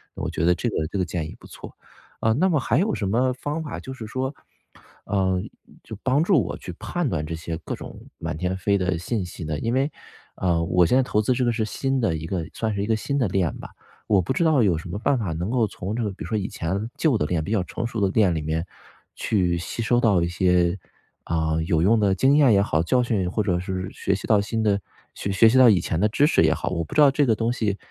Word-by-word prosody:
我 - - -3
觉 80 - -3
得 90 - +5
这 120 - -2
个 80 -7 -2
这 100 - -5
个 90 - +1
建 85 -2 -3
议 - - -10
不 - - -14
错。 - - -11 0.4
呃， 110 - +2
那 185 +10 +2
么 155 - +2
还 120 -2 0
有 210 +3 +1
什 100 - -2
么 125 +6 +2
方 145 +5 -4
法 150 - -6
就 130 - -8
是 115 -4 -8
说 130 +4 -3 0.7
呃， 95 -2 0 0.4
就 110 - -9
帮 135 +3 +2
助 170 - +3
我 - - -5
去 90 - -8
判 175 -3 -2
断 80 -4 -2
这 80 - -5
些 80 0 -5
各 - - -5
种 - - -11
满 - - -4
天 90 +2 -2
飞 100 +2 +1
的 90 -2 0
信 105 +1 -2
息 90 -1 -8
呢？ 75 -1 -2
因 115 +6 -1
为， 135 +3 +1 0.5
呃， 85 -3 +1
我 90 +1 +3
现 125 - +3
在 135 - +4
投 105 -4 +1
资 110 - 0
这 125 0 0
个 120 - +2
是 115 -1 -1
新 135 +4 -1
的 90 -8 +1
一 80 - -6
个 85 -2 -2
算 110 -2 -2
是 100 - -1
一 105 - -3
个 110 - +2
新 140 +5 -2
的 125 - +2
链 95 -3 0
吧， - - -9 0.4
我 100 -3 +4
不 90 - -2
知 170 - +1
道 155 -6 +4
有 90 -6 +2
什 80 +2 -8
么 95 - -4
办 130 +2 +1
法 95 -8 -2
能 85 +6 -3
够 120 -4 +2
从 100 +2 -5
这 120 - -1
个 105 - -1
比 95 - -8
如 - - -7
说 110 - -1
以 100 0 -2
前 95 +7 -3
旧 155 -7 +2
的 - - 0
链， 80 -1 -1
比 100 - -5
较 105 -5 +1
成 115 - -5
熟 115 -2 -4
的 100 - +3
链 100 -6 +3
里 80 - -2
面 80 +2 -2 0.5
去 90 -5 0
吸 85 +7 -4
收 120 +2 +2
到 105 -7 +3
一 - - 0
些， 90 0 +2 0.5
呃， 80 -1 0
有 80 -1 +2
用 110 +4 +4
的 100 -2 +2
经 135 +9 +4
验 140 -5 +6
也 100 - +4
好， 80 -6 +1
教 125 +9 +2
训 100 -7 0
或 110 - 0
者 90 -3 0
是 95 0 -4
学 100 - -1
习 95 - -6
到 105 -2 +4
新 110 +2 -2
的， 100 -2 +2 0.4
学 100 - -3
学 110 +3 +6
习 130 - +3
到 125 -2 +8
以 100 -5 +4
前 80 -1 -2
的 105 - +3
知 140 +7 +3
识 - - +3
也 - - +4
好， - - -3
我 85 -3 -2
不 80 - -9
知 150 - +5
道 140 -2 +7
这 145 +1 +2
个 110 - +3
东 115 +2 0
西， 105 -5 -1
100 Hz, 295 characters per minute, -24 LUFS, 90-120 Hz, 0.7 s, 到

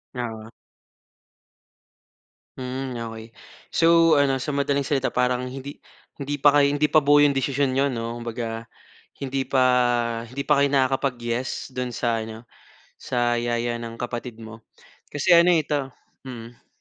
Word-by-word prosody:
Oo. 110 -3 -5 2.1
Mm, 130 0 -5 0.2
okey. 110 0 -9 0.4
So 165 -1 +4
ano, 140 -2 +2
sa 140 +2 -3
madaling 140 -1 0
salita, 135 -3 0
parang 125 0 0
hindi 135 +2 -7 0.4
hindi 145 0 -4
pa 145 +1 +5
kayo 140 -1 +4
hindi 145 +1 +1
pa 155 0 +3
buo 145 +1 +5
'yong 145 -1 +4
desisyon 135 0 0
niyo 140 +1 +2
'no, 115 -1 -4
kumbaga 115 -1 -5 0.6
hindi 135 0 -2
pa 130 -1 +2 0.6
hindi 130 +4 -5
pa 150 0 +2
kayo 140 0 +4
nakakapag-yes 130 -2 -1
do'n 125 -1 -4
sa 115 -1 0
ano, 110 0 -9 0.5
sa 120 -1 -1
yaya 120 0 -1
ng 115 0 -7
kapatid 120 -1 -5
mo? 110 0 -11 0.5
Kasi 160 +5 +4
ano 170 +1 +6
ito 145 -5 0 0.3
mm. 120 -2 -11
130 Hz, 140 wpm, -24 LUFS, 120-140 Hz, 2.1 s, ano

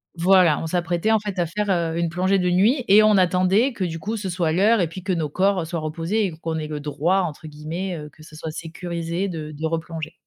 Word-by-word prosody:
voilà, 180 -2 +4
on 165 - -3
s'apprêtait, 175 +4 0
en 220 - +5
fait, 200 -3 -5
à 170 - +1
faire, 205 +4 -2
heu, 170 -2 0
une 170 0 0
plongée 185 +3 +1
de 180 -1 0
nuit 230 +9 +3
et 205 +2 +7
on 215 -2 +5
attendait 185 +7 +3
que, 200 - -3
du 165 -2 -3
coup, 210 +7 -4
ce 200 -3 -4
soit 170 -3 0
l'heure 205 +7 +3
et 175 - +2
puis 170 +4 -8
que 185 +2 -3
nos 165 -4 0
corps 185 +3 +1
soient 170 +1 -4
reposés 165 +7 -1
et 180 - -5
qu'on 160 0 -3
ait 155 - -4
«le 150 -1 -5
droit», 155 +6 0
entre 160 -2 -5
guillemets, 160 +5 -5
heu, 150 -1 -8
que 150 - -20
ce 155 0 -14
soit 160 0 -6
sécurisé 170 +2 -4
de 155 -4 -6
de 155 +1 -5
replonger. 160 -1 -4
175 Hz, 250 wpm, -23 LUFS, 160-190 Hz, -, et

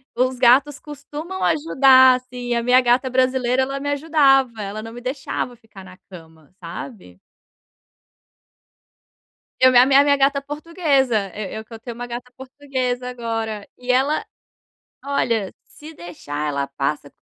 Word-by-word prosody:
os 255 +1 0
gatos 270 +4 +4
costumam 300 +5 -8
ajudar, 265 -4 +5
assim. 250 -1 -6
A 235 - -1
minha 250 +1 +5
gata 250 +2 +2
brasileira 255 0 +1
ela 275 +1 -4
me 285 +1 -4
ajudava 275 -6 +2
ela 205 +2 -5
não 225 0 -9
me 245 - -10
deixava 255 -1 -4
ficar 215 -4 -15
na 185 0 -14
cama, 160 -4 -15
sabe. 170 - -10 2.4
Eu 255 0 +6
me 245 - +4
a 250 - +7
mi 270 0 +2
a 280 - +7
minha 285 -1 +3
gata 275 +1 +2
portuguesa, 280 - -1
eu 210 +1 -6
eu 220 - -10
que 230 - -15
eu 225 - -9
tenho 235 0 -8
uma 245 0 -7
gata 245 +1 -8
portuguesa 260 -2 -4
agora 225 -3 -5
e 250 0 -2
ela 270 +4 +1 0.8
olha, 230 -8 -1
se 310 +2 -13
deixar 150 - -6
ela 140 -1 -2
passa, 140 +1 -4
250 Hz, 155 wpm, -21 LUFS, 220-275 Hz, 2.4 s, a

